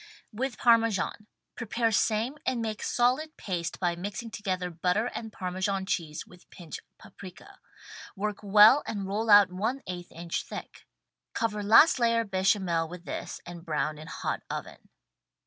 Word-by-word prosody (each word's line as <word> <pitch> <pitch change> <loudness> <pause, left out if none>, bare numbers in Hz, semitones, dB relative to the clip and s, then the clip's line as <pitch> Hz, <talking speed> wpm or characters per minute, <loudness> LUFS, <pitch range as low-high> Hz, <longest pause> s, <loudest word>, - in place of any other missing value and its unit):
With 245 +2 -3
Parmesan. 225 -3 +2 0.3
Prepare 235 0 -1
same 225 +6 +1
and 255 -2 -1
make 220 -2 -3
solid 260 +6 +1
paste 175 -4 -4
by 175 -2 0
mixing 205 +6 -6
together 185 -5 -3
butter 180 +6 0
and 225 -1 -6
Parmesan 190 +1 -2
cheese 160 -5 -3
with 180 0 -19
pinch 170 -4 -9 0.2
paprika. 190 -3 -13 0.6
Work 210 +1 -3
well 210 +7 +7
and 200 -3 -3
roll 215 +3 -2
out 205 -3 +7
one 225 +9 -2
eighth 175 -1 -7
inch 170 0 -4
thick. - - -9 0.5
Cover 210 -2 -1
last 225 +8 +6
layer 230 -1 +3
bechamel 190 -4 +1
with 180 +1 -10
this - - -6
and 175 -1 -9
brown 150 -2 -2
in 155 - -10
hot - - -3
oven. - - -7
205 Hz, 145 wpm, -28 LUFS, 180-225 Hz, 0.6 s, well